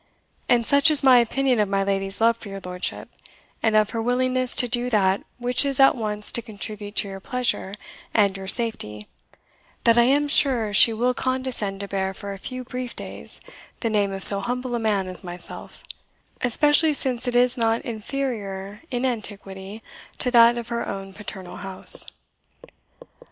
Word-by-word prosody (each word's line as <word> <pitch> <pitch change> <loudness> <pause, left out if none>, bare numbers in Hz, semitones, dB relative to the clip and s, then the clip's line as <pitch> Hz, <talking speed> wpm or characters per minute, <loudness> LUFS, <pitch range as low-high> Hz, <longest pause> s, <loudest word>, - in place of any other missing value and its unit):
And 240 -1 +3
such 280 +4 +4
is 300 -3 +5
my 255 -2 +7
opinion 250 +1 +1
of 210 -2 +1
my 195 0 0
lady's 195 0 -2
love 230 +1 +4
for 225 -2 -11
your 195 0 -7
lordship, 180 0 -4 0.5
and 220 -1 +1
of 215 -1 +3
her 230 -1 -3
willingness 255 +1 0
to 245 - +2
do 245 +1 0
that 195 -4 +2 0.2
which 245 +2 +2
is 275 -1 -2
at 270 - +7
once 210 -3 -1
to 235 - -1
contribute 210 -2 -7
to - - +1
your 195 0 -8
pleasure 240 -3 -2 0.4
and 200 -3 +2
your 195 0 -7
safety, 190 - +1 0.8
that 230 0 +4
I 235 - +5
am 285 +3 +2
sure 245 -7 +2
she 225 - +7
will 240 +3 0
condescend 255 -7 -1
to 200 - -5
bear 190 -1 -3
for 200 +1 -6
a 195 - -10
few 255 +4 -6
brief 250 0 -6
days - - -3 0.4
the 230 - -1
name 205 -2 +1
of 195 0 -4
so 200 - +7
humble 245 +4 -4
a 240 - -1
man 205 -4 0
as 185 -3 -7
myself, 175 -1 -9 0.6
especially 295 +5 +3
since 255 -3 -1
it 245 - -1
is 245 0 +3
not 230 -2 0
inferior 215 -4 -5
in 250 0 -2
antiquity 205 -3 -5 0.3
to 250 - 0
that 235 0 +6
of 235 0 -6
her 235 0 -2
own 195 -1 -6
paternal 190 -3 -6
house." 190 -1 0
225 Hz, 180 wpm, -23 LUFS, 195-250 Hz, 0.8 s, my